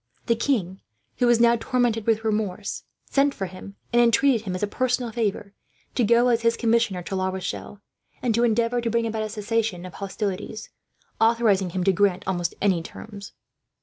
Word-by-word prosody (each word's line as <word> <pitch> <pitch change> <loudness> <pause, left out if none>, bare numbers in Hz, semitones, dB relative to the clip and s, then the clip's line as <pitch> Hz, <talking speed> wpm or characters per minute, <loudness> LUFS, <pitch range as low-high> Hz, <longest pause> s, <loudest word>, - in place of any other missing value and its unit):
The 230 - +2
king, 215 -7 -1 0.4
who 245 - +2
was 240 -1 +4
now 235 0 +5
tormented 230 -2 0
with 225 -1 +2
remorse, 210 -2 -2 0.3
sent 280 0 +3
for 195 - -3
him; 185 +2 -10 0.2
and 240 - +5
entreated 235 -1 +3
him, 185 - -2
as 185 - -4
a - - +2
personal 245 +1 -1
favour, 210 -3 -2 0.4
to 250 - +1
go 235 +3 +4
as 235 -1 +2
his 230 0 +2
Commissioner 230 -6 +1
to 190 - -4
La 190 0 0
Rochelle, 190 +2 -5 0.4
and 245 -3 0
to 235 +2 +2
endeavour 235 +1 +2
to 230 - -1
bring 230 0 +1
about 220 -1 -2
a 215 - -3
cessation 210 -3 -2
of 185 - -9
hostilities, 205 +1 -5 0.5
authorizing 225 -5 +3
him 180 +1 -2
to 195 - +3
grant 190 0 +2
almost 175 -2 -1
any 190 -4 +3
terms. 200 +4 -10
220 Hz, 185 wpm, -24 LUFS, 195-235 Hz, 0.5 s, now